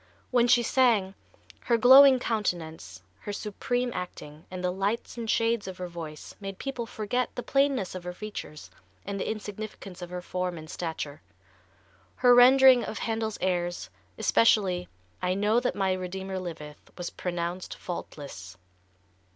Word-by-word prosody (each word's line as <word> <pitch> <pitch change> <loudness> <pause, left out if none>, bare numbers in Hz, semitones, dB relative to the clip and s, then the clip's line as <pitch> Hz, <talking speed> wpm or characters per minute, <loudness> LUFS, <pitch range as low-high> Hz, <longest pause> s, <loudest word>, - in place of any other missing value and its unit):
When 245 -1 +4
she 245 -1 +5
sang, 230 -7 +3 0.5
her 235 - +3
glowing 265 +3 +9
countenance, 165 - -3 0.2
her 205 - -6
supreme 245 +4 -2
acting 160 -4 -7
and 185 -1 -6
the 180 - +1
lights 200 +5 -2
and 230 -2 -5
shades 230 -2 +1
of 185 -1 -7
her 180 - -5
voice 160 -3 -8
made 195 -1 -6
people 255 -4 -4
forget 245 +4 -2
the 245 - -4
plainness 275 -7 +1
of 185 -1 -6
her 180 - -4
features 180 -6 -8 0.3
and 200 0 -4
the - - -2
insignificance 210 -3 -7
of 175 - -6
her 180 0 -6
form 180 -1 -3
and 155 0 -9
stature. 160 -4 -5 0.9
Her 245 -1 +5
rendering 255 0 +7
of 215 - -5
Handel's 220 -1 -2
airs, 175 - -1 0.3
especially 190 -6 +3 0.3
"I 180 - 0
Know 210 +4 +3
that 245 - -1
My 195 -2 +1
Redeemer 190 +1 -4
Liveth," 160 -4 -8
was 175 -1 -5
pronounced 175 0 -4
faultless. 140 - -7
195 Hz, 150 wpm, -28 LUFS, 175-230 Hz, 0.9 s, glowing